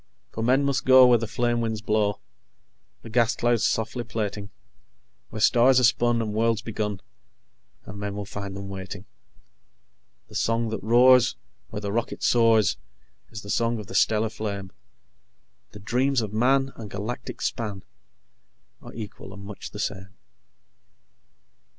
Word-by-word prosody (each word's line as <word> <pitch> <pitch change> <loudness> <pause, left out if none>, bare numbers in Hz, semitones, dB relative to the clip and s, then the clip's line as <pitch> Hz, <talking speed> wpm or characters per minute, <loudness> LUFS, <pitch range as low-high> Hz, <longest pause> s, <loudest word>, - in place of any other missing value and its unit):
_ - - -40
"_For 110 - -3
men 130 +4 +3
must 140 -1 0
go 130 0 +8
where 120 -1 +5
the 115 - -3
flame 120 +2 0
winds 110 -2 -2
blow, 105 -1 0 0.8
The - - -9
gas 120 0 +2
clouds 120 -2 +1
softly 115 +2 -2
plaiting; 105 -3 -4 0.8
Where 110 - -7
stars 125 +4 +5
are - - 0
spun 120 -1 +3
and 105 -1 -4
worlds 110 0 +1
begun, 105 -3 -3 0.8
And 100 -1 -9
men 100 -1 -4
will 105 0 -5
find 100 0 -7
them 100 0 -7
waiting._ 95 0 -7 1.3
"_The - - -12
song 115 0 0
that 110 - -4
roars 120 - +5 0.3
where 105 - -6
the 100 -1 -3
rocket 115 +2 -3
soars 115 -4 +4 0.5
Is 110 -2 -9
the 100 - -5
song 115 +1 +1
of 105 - -7
the 95 - -11
stellar 110 +2 +2
flame; 100 -3 -5 1.0
The 105 - -12
dreams 125 +5 +1
of 105 -2 -5
Man 135 +4 +2
and 110 -3 -9
galactic 105 +6 -6
span 105 -5 -3 1.0
Are - - -12
equal 105 -3 -8
and 100 - -11
much 100 0 -8
the - - -10
same. 95 -2 -5
110 Hz, 155 wpm, -25 LUFS, 105-120 Hz, 1.3 s, go